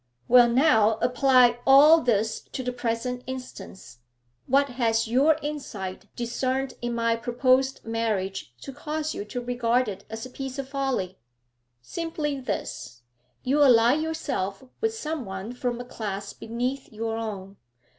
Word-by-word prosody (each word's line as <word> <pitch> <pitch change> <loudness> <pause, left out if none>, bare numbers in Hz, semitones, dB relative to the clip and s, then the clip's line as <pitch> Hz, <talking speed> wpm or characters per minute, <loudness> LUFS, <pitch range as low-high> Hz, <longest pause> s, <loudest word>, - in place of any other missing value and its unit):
'Well 245 -1 +7
now, 230 -5 +4
apply 250 -1 +4
all 295 +4 +7
this 220 -2 +1
to 260 - -3
the 250 0 -3
present 245 +1 -3
instance. 250 - -9 0.5
What 275 +2 +3
has 230 -2 +1
your 280 +7 +4
insight 235 -11 -5
discerned 255 +2 -2
in 240 0 -2
my 230 0 +1
proposed 255 +3 +1
marriage 210 - -2
to 275 - -8
cause 310 +2 -3
you 205 - -5
to 230 +4 -5
regard 245 0 0
it 200 -1 -6
as 225 +2 -6
a 255 - -10
piece 270 0 -6
of 275 -1 -4
folly?' 265 -9 -2 0.6
'Simply 305 - -3
this. 195 - -5 0.4
You 280 +4 +2
ally 240 -3 +6
yourself 290 -10 -2 0.2
with 445 0 0
some 315 - -4
one 190 +3 -6
from 245 -1 -3
a 245 - -6
class 205 -5 -5
beneath 250 +4 -4
your 225 +1 -3
own. 200 -3 -6
245 Hz, 145 wpm, -26 LUFS, 225-270 Hz, 0.6 s, Well